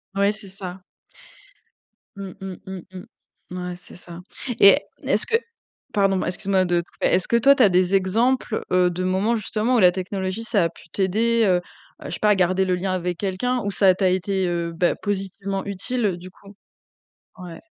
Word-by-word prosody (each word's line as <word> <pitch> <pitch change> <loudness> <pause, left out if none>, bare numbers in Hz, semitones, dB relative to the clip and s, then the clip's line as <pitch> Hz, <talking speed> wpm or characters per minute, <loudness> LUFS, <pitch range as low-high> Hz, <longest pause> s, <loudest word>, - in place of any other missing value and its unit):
Ouais, 200 +1 +3
c'est 210 -2 -10
ça. 185 -1 -8 1.3
Mmh, 195 -2 -7
mmh, 190 -1 -6
mmh, 190 -2 -7
mmh. 185 - -9 0.5
Mouais, 180 0 -5
c'est 180 - -13
ça 175 -1 -11 0.4
et 200 +9 +7 0.2
n - - -6
est-ce - - +2
que 455 - 0 0.6
pardon, 195 -1 +2
m - - -1
excuse-moi 190 +1 0
de 175 -1 +1
te - - -16
couper. - - -1
Est-ce 185 +1 +2
que 235 - +4
toi 275 +4 +6
tu 260 - +4
as 205 - +6
des 185 +1 +2
exemples, 220 +5 +1
heu, 180 -1 +4
de 180 +1 -4
moments 195 +5 +1
justement 220 +4 -1
où 240 - +4
la 180 -2 +6
technologie, 190 +3 -3
ça 205 -6 +1
a - - 0
pu 170 - -18
t'aider, 220 +6 +1
heu 185 -3 +4 0.5
heu, - - -12
je - - -5
sais - - -5
pas 210 - +3
à 205 - +5
garder 185 +1 +2
le 185 -1 +1
lien 185 +1 -2
avec 180 -1 -2
quelqu'un 230 +6 -1
ou 205 - -2
ça 190 -1 +4
t'a 190 0 +2
été, 185 0 0
heu, 170 -1 -2
beh, 175 +1 +1
positivement 195 -1 -3
utile, 215 +4 -2
heu, 180 -3 0
du 180 +1 -11
coup 200 +2 -17 0.8
Ouais. 175 -2 -9
190 Hz, 205 wpm, -23 LUFS, 180-205 Hz, 1.3 s, et